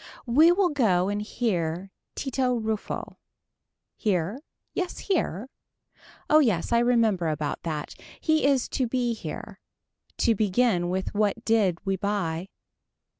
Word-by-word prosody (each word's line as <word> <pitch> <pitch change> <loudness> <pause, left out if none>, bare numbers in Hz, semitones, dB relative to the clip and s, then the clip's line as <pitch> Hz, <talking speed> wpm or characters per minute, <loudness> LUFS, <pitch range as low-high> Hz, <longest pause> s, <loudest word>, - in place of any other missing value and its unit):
We 300 +8 +6
will 365 0 +3
go 195 -10 +2
and 205 0 -1
hear 190 -5 -2 0.2
Tito 260 -2 0
Ruffo. 220 -2 -4 0.8
Here. 195 +3 -1 0.3
Yes 365 -1 -3
here. 260 - -1 0.8
Oh 305 - +6
yes 220 - +1
I 235 - +4
remember 230 -7 +2
about 150 -1 -2
that. 155 -3 -4 0.3
He 315 -1 +2
is 270 -3 +2
to 255 - 0
be 245 0 0
here. 225 - -7 0.6
To 230 - +3
begin 205 -3 +1
with 185 +1 -2
what 210 +2 0
did 210 -6 +3
we 195 -1 0
buy. 185 -3 -2
215 Hz, 125 wpm, -26 LUFS, 185-250 Hz, 0.8 s, We